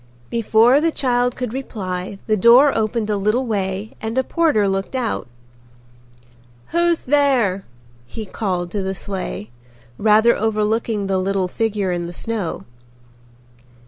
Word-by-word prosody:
Before 230 +4 +4
the 330 - +2
child 245 -4 0
could 250 -3 -4
reply 195 -7 -5
the 215 - +2
door 240 +7 +6
opened 215 0 -1
a 205 - 0
little 215 +6 +1
way 200 -1 -3
and 225 +2 -4
a 260 - +3
porter 300 - +2
looked 195 +5 -2
out. 240 - -2 1.4
"Who's 340 0 +1
there?" 250 -9 +2 0.4
he 220 - -7
called 180 -4 -3
to 205 - -2
the 190 0 -3
sleigh, 185 - -5 0.5
rather 220 +2 +4
overlooking 215 0 0
the 190 -1 0
little 190 0 0
figure 205 -1 -1
in 175 -1 -2
the 175 - -8
snow. 210 -2 -4
215 Hz, 135 wpm, -20 LUFS, 195-245 Hz, 1.4 s, door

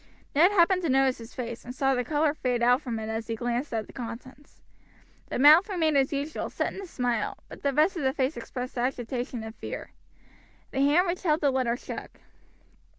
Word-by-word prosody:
Ned 330 +6 +6
happened 370 -1 +4
to 335 - -1
notice 265 -1 +3
his 230 +1 -11
face, 235 -2 -5
and 250 +1 -8
saw 270 0 +2
the 250 -1 0
color 295 +3 +1
fade 250 -5 -1
out 245 +3 +4
from 240 -6 -4
it 220 0 -4
as 220 0 -3
he 230 - -2
glanced 240 +4 -2
at 220 -2 -2
the - - -15
contents. 255 +4 -9 0.7
The - - -2
mouth 310 - +7
remained 325 -6 +1
as 270 +1 +3
usual, 290 +2 -3
set - - -2
in - - -7
a 390 - -8
smile, 245 -8 -1
but - - -11
the 280 - +1
rest 305 +8 +3
of - - -2
the 265 - +3
face 270 +1 -1
expressed 250 -1 -6
agitation 245 -1 -2
and 220 0 -7
fear. - - -7 0.8
The - - -2
hand 295 +6 +4
which 355 0 -2
held 315 -3 +1
the 285 -2 +3
letter 250 -2 0
shook. - - -8
265 Hz, 215 wpm, -27 LUFS, 240-305 Hz, 0.8 s, mouth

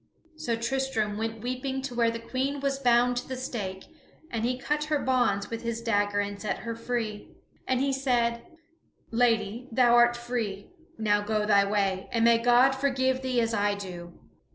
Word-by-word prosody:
So 310 -7 -2
Tristram 230 -3 -1
went 225 +1 -4
weeping 260 +2 -3
to 270 -2 -4
where 235 -1 +2
the 230 - -3
Queen 265 +4 -2
was 275 0 -1
bound 245 -1 +3
to 245 - -4
the 260 - -4
stake; 200 -7 -5 0.5
and 225 -2 -2
he 250 +1 0
cut 300 +3 -1
her 305 0 +1
bonds 245 -8 +1
with 230 - -4
his 235 -1 -3
dagger 205 -3 +1
and 200 0 -3
set 210 - -2
her 230 -1 -4
free. 230 -3 -4 0.4
And 260 -1 +1
he 275 +1 +1
said: 240 -3 +1 0.7
"Lady, 230 0 +1
thou 240 0 +4
art 240 0 +5
free; 235 - -4 0.3
now 205 -2 +2
go 210 0 -1
thy 200 -1 +4
way, 195 -2 0
and 230 -1 +2
may 235 0 +5
God 245 +3 +5
forgive 260 -1 0
thee 255 -2 0
as 230 0 -1
I 205 -1 +1
do." 175 -3 -9
235 Hz, 180 wpm, -27 LUFS, 210-255 Hz, 0.7 s, art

